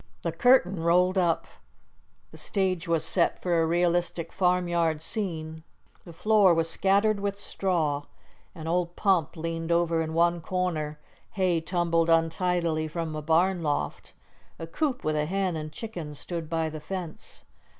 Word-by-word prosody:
The - - -1
curtain 220 -9 +3
rolled 180 +3 +3
up. 175 -3 +1 0.9
The - - -13
stage 185 -3 -1
was 165 -2 +1
set 175 - +1
for 175 -2 +1
a 160 - +1
realistic 175 0 0
farmyard 175 -4 +1
scene. 160 -5 -3 0.4
The 170 - -10
floor 200 +1 +4
was 165 0 +1
scattered 200 +5 +2
with 200 0 -2
straw, 165 -8 -1 0.5
an 160 -3 -8
old 175 +1 0
pump 185 -6 +1
leaned 165 +1 -3
over 170 -1 +2
in 160 0 -3
one 170 0 +2
corner, 160 -4 -2 0.4
hay 185 -4 +1
tumbled 170 -1 +1
untidily 165 -1 +1
from 160 0 -4
a 155 - -4
barn 170 +4 +2
loft, 150 -2 -3 0.4
a 165 - -6
coop 260 - -2
with 155 0 0
a 150 0 0
hen 190 -1 -1
and 155 -1 -5
chickens 160 -6 -7
stood 165 0 -5
by 165 -1 0
the 155 0 -6
fence. 175 0 -7
170 Hz, 150 wpm, -27 LUFS, 160-185 Hz, 0.9 s, floor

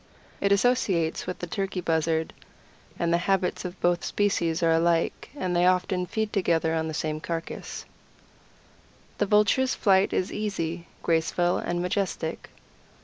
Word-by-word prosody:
It 200 - +2
associates 195 -8 +2
with 180 - -3
the - - -5
Turkey 195 +1 -3
Buzzard, 160 -1 0 0.6
and 170 0 +1
the 170 - +3
habits 190 -1 +1
of 180 +1 -6
both 175 0 +2
species 175 -5 0
are 165 - +4
alike, 165 0 +1
and 185 -10 -2
they 175 +1 +4
often 180 0 +1
feed 220 +1 -2
together 165 -4 +1
on 160 0 0
the 160 - -4
same 155 0 -2
carcass. 165 0 -5 1.3
The 205 - +2
Vulture's 210 +6 +3
flight 190 -1 +3
is 185 - -1
easy, 170 -5 -3 0.2
graceful, 170 +2 +1
and 175 0 -2
majestic. 180 -3 -2
175 Hz, 145 wpm, -26 LUFS, 165-195 Hz, 1.3 s, are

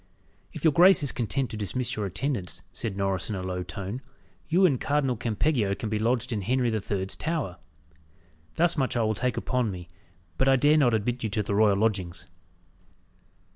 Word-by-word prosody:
"If - - -9
your 160 -3 +4
grace 180 +1 +6
is 140 - +2
content 130 +2 -1
to 110 - -5
dismiss 115 +4 -2
your 105 -2 -2
attendants," 95 -4 -3
said 100 +1 -3
Norris 95 -1 -1
in 105 - -2
a 95 - -4
low 90 0 -3
tone, 100 +6 -6 0.5
"you 185 +3 +4
and 140 -8 +2
Cardinal 140 -3 +1
Campeggio 115 -2 0
can 110 +3 -5
be 110 0 -1
lodged 120 +2 0
in 105 - -2
Henry 125 +3 +1
the 110 -1 -1
Third's 95 -1 -2
Tower. 155 - -3 1.0
Thus 170 +1 +2
much 130 -4 0
I 115 - +2
will 110 0 +1
take 125 +3 -1
upon 125 -3 0
me; 90 -3 -7 0.5
but 130 - +3
I 135 - +6
dare 145 +4 +4
not 125 -6 +4
admit 120 +3 -2
you 110 - -2
to 105 +1 -1
the 100 - -3
royal 105 -1 +4
lodgings." 100 -5 -1
115 Hz, 195 wpm, -27 LUFS, 100-130 Hz, 1.0 s, grace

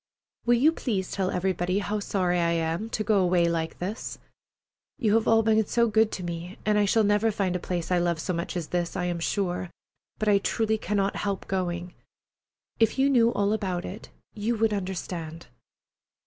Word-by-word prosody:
Will 240 - +6
you 280 +7 +5
please 205 - -2
tell 190 -2 -1
everybody 185 0 0
how 205 +1 -1
sorry 180 -3 0
I 170 0 +2
am 165 +6 -1
to 215 - -2
go 210 -1 +3
away 175 -2 +3
like 165 -1 -2
this? 195 +5 -5 0.8
You 220 -7 +1
have 225 0 +2
all 225 0 +5
been 220 0 +3
so 235 -1 +2
good 220 0 +3
to 185 - -4
me, 175 +2 -5
and 210 0 +3
I 205 - +4
shall 220 +3 +3
never 205 +2 +3
find 195 -3 -1
a - - 0
place 175 -1 -3
I 180 - +3
love 175 -2 0
so 180 - -2
much 170 +2 -3
as 165 -3 -4
this, 175 -1 -2
I 180 - -1
am 175 -1 -2
sure, 180 0 -1 0.5
but 215 - -2
I 205 -1 +5
truly 220 +2 0
cannot 200 -1 0
help 200 -2 -3
going. 180 -2 -2 0.9
If 225 +2 +3
you 275 +1 +3
knew 235 -3 +4
all 205 +1 +1
about 185 -5 -2
it, 205 +4 -8 0.2
you 220 +3 -1
would 220 0 +2
understand. 175 -4 -4
195 Hz, 195 wpm, -27 LUFS, 175-215 Hz, 0.9 s, Will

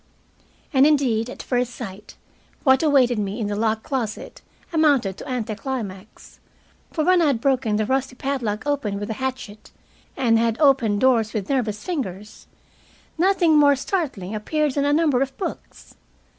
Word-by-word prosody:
And 270 +1 +6
indeed, 250 -6 +1
at - - -8
first 245 -1 -1
sight, 205 -3 -9 0.5
what 265 -2 +4
awaited 265 -7 +3
me 205 +2 -3
in 220 - -1
the 205 0 -2
locked 220 +1 0
closet 240 -6 -4 0.3
amounted 285 - +2
to - - -9
anti 235 -4 -2
climax. 210 -3 -7 0.5
For 315 - -1
when 365 0 +4
I 325 - +3
had 270 -5 +1
broken 255 -4 +1
the 215 0 0
rusty 265 +1 -1
padlock 250 -5 -3
open 265 -9 -1
with 205 +1 -4
a 220 - -6
hatchet, 255 -5 -5 0.5
and 230 -3 +3
had 230 0 +1
opened 255 -9 +3
doors 230 -4 +3
with 210 +3 -3
nervous 220 -6 -1
fingers, 215 - -5 0.7
nothing 345 -4 +4
more 285 -1 +5
startling 265 - -3
appeared 295 +7 -1
than 280 0 0
a 290 - +2
number 295 -4 +2
of 270 -1 -2
books. 390 - -7
250 Hz, 160 wpm, -22 LUFS, 215-285 Hz, 0.7 s, And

